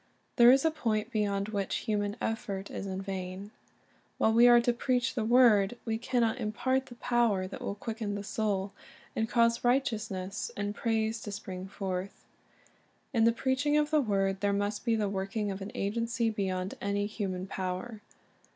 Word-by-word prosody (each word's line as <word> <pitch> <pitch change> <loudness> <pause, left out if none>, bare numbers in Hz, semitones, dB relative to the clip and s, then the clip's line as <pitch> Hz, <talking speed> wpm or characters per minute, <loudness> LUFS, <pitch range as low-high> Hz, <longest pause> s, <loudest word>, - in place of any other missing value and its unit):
There 240 0 +9
is 270 +3 +4
a 320 - +4
point 225 -7 -1
beyond 205 -2 0
which 200 -3 -2
human 205 -1 -1
effort 200 -3 -3
is 195 - -5
in 190 0 -4
vain. 190 +1 -5 0.7
While 220 - +3
we 235 +2 +7
are 240 0 +8
to 240 0 +2
preach 245 0 0
the 235 - -1
word, 230 -2 +5
we 225 -1 -1
can 245 +1 0
not 230 +2 +1
impart 260 +4 0
the 240 - -11
power 235 -6 +1
that 185 - -8
will 200 - -3
quicken 220 -1 -4
the 200 - -4
soul, 200 -2 -1 0.4
and 225 0 0
cause 230 -1 +3
righteousness 220 -7 -1
and 205 0 -2
praise 220 0 -1
to 205 - -6
spring 190 -2 -6
forth. 190 -1 -5 0.9
In 225 -2 +4
the 230 - +6
preaching 265 +5 +1
of 300 0 +1
the 305 -1 +4
word 195 -4 0
there 200 0 +2
■, - - +1
must 205 +2 -2
be 230 -2 +3
the 215 -2 0
working 200 +2 -2
of 195 0 -6
an 195 - -6
agency 230 +3 0
beyond 190 -3 -2
''^•*> - - -13
any 200 0 0
human 195 -3 -3
power. 190 +4 -4
215 Hz, 185 wpm, -30 LUFS, 195-235 Hz, 0.9 s, There